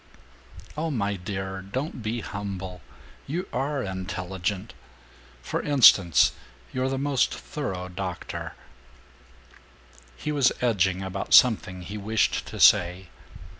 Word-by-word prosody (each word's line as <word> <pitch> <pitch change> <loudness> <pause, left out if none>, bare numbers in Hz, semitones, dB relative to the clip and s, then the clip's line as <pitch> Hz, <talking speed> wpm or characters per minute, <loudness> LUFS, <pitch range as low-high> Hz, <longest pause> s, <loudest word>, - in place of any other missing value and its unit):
"Oh, 160 +2 -2
my 105 -8 -1
dear, 95 0 -5
don't 130 - -5
be 110 +2 -3
humble! 95 -3 -6 0.5
You 175 +6 -3
are 135 +1 -1
intelligent! 95 +1 -4 0.7
For - - -2
instance, 110 - +6 0.4
you're 130 +1 0
the 135 - -2
most 140 -1 +1
thorough 95 - -5
doctor 90 0 -6 0.9
" - - -25
He 150 - -3
was 140 -4 +3
edging 95 -6 +1
about 95 +1 +1
something 95 -7 +4
he 105 +4 -6
wished 110 +2 0
to - - -8
say. 90 +1 +5
100 Hz, 115 wpm, -26 LUFS, 90-130 Hz, 0.9 s, instance